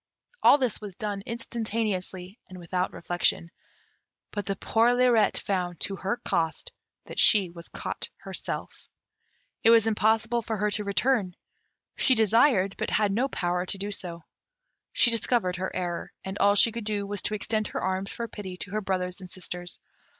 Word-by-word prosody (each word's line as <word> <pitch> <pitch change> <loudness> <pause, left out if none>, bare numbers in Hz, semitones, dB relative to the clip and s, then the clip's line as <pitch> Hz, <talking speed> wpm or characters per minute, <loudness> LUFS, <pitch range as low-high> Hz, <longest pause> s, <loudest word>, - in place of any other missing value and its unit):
All - - +7
this 255 -6 -1
was 205 -3 -8
done 205 -1 -3
instantaneously, 215 -5 -3
and 185 - -10
without 180 +1 -2
reflection; 170 -1 0 0.8
but 205 -2 -4
the 195 - 0
poor 230 +4 +2
Lirette 245 -3 +4
found, 180 -3 -2
to 195 - -1
her 195 +6 -2
cost, 170 - -1 0.3
that - - -5
she 195 -5 +6
was 170 -1 -11
caught - - -5
herself. - - -5 0.8
It - - +6
was 230 -1 +6
impossible 225 +2 +2
for 220 -1 -3
her 210 +1 0
to 210 - +1
return; 200 -2 +1 0.6
she 260 - +4
desired, 220 -2 +4
but - - -1
had 210 -2 +2
no 240 +7 +1
power 180 -7 -1
to 200 - -3
do 200 +1 -4
so. 170 -4 -5 0.7
She 240 - +4
discovered 225 -5 +1
her 190 +1 -2
error, 175 -2 -3
and 190 0 -5
all 200 0 +5
she 225 +3 +6
could 230 -1 -6
do 205 -1 -1
was 205 0 -4
to 215 - -1
extend 215 +1 -1
her - - -4
arms 190 +1 -1
for 235 - -4
pity 190 -5 -7
to 190 - -6
her 215 +1 -1
brothers 185 -1 -2
and 185 - -9
sisters. 180 -1 -6
200 Hz, 170 wpm, -27 LUFS, 185-225 Hz, 0.8 s, All